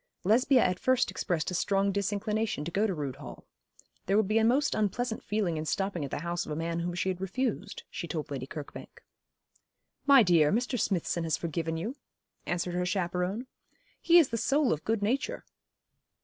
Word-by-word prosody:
Lesbia 250 Hz, +6 st, +4 dB
at 180 Hz, 0 st, 0 dB
first 255 Hz, -1 st, +2 dB
expressed 175 Hz, -3 st, -2 dB
a -, -, -4 dB
strong 195 Hz, +2 st, +1 dB
disinclination 205 Hz, -2 st, -1 dB
to 170 Hz, -, -4 dB
go 205 Hz, +5 st, +2 dB
to 195 Hz, -, -1 dB
Rood 140 Hz, -4 st, -4 dB
Hall. -, -, -10 dB, 0.6 s
There 195 Hz, +2 st, +3 dB
would 215 Hz, -2 st, +3 dB
be 215 Hz, +2 st, +3 dB
a -, -, +2 dB
most 260 Hz, +6 st, +3 dB
unpleasant 220 Hz, +3 st, -1 dB
feeling 200 Hz, -6 st, -1 dB
in 155 Hz, -, -3 dB
stopping 195 Hz, -1 st, -1 dB
at 140 Hz, -, -4 dB
the -, -, -4 dB
house 170 Hz, +1 st, -2 dB
of -, -, -8 dB
a -, -, -2 dB
man 165 Hz, +1 st, -2 dB
whom 175 Hz, +1 st, -3 dB
she 185 Hz, +1 st, 0 dB
had 185 Hz, 0 st, -3 dB
refused, 230 Hz, +5 st, -3 dB
she 170 Hz, -, -6 dB
told 155 Hz, -3 st, -4 dB
Lady 130 Hz, -2 st, -4 dB
Kirkbank. 150 Hz, -1 st, -9 dB, 1.0 s
'My 275 Hz, -4 st, +8 dB
dear, 165 Hz, -6 st, +4 dB
Mr. 245 Hz, +3 st, 0 dB
Smithson 175 Hz, -3 st, 0 dB
has 160 Hz, -2 st, 0 dB
forgiven 165 Hz, 0 st, -3 dB
you,' 225 Hz, -, -4 dB, 0.5 s
answered 175 Hz, 0 st, -1 dB
her 180 Hz, 0 st, 0 dB
chaperon. 180 Hz, +4 st, -1 dB, 0.6 s
'He 345 Hz, 0 st, +6 dB
is 325 Hz, -6 st, +6 dB
the 230 Hz, -, -2 dB
soul 275 Hz, -, +2 dB
of 155 Hz, -, -5 dB
good 220 Hz, -2 st, 0 dB
nature.' 275 Hz, -, -1 dB
190 Hz, 190 wpm, -29 LUFS, 170-225 Hz, 1.0 s, My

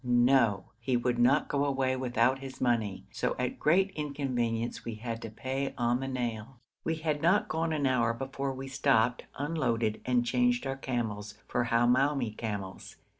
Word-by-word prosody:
No! 120 Hz, -4 st, +3 dB
he 120 Hz, +2 st, +1 dB
would 120 Hz, 0 st, 0 dB
not 135 Hz, +5 st, +4 dB
go 140 Hz, -1 st, 0 dB
away 135 Hz, -2 st, +1 dB
without 130 Hz, 0 st, +1 dB
his 135 Hz, -1 st, -8 dB
money; 115 Hz, -6 st, 0 dB
so -, -, -1 dB
at -, -, -2 dB
great 190 Hz, +6 st, +3 dB
inconvenience 130 Hz, -7 st, -2 dB
we 115 Hz, -, -5 dB
had 115 Hz, +1 st, -5 dB
to 115 Hz, -, -6 dB
pay 130 Hz, +5 st, -3 dB
on 120 Hz, 0 st, +1 dB
the 135 Hz, -, -3 dB
nail. 120 Hz, -1 st, -4 dB, 0.2 s
We 165 Hz, -, 0 dB
had 155 Hz, -2 st, -2 dB
not 185 Hz, +5 st, +3 dB
gone 160 Hz, +1 st, -1 dB
an 150 Hz, -3 st, 0 dB
hour 125 Hz, -3 st, +3 dB
before 135 Hz, +3 st, -3 dB
we 135 Hz, 0 st, -6 dB
stopped, 130 Hz, -3 st, +2 dB
unloaded, 120 Hz, -8 st, -1 dB
and 125 Hz, -1 st, +2 dB
changed 125 Hz, +1 st, +2 dB
our 135 Hz, 0 st, -2 dB
camels 110 Hz, -6 st, -3 dB
for 120 Hz, -, 0 dB
Hamoumi 120 Hz, +1 st, +2 dB
camels. 100 Hz, -4 st, -5 dB
125 Hz, 170 wpm, -30 LUFS, 115-135 Hz, 0.2 s, not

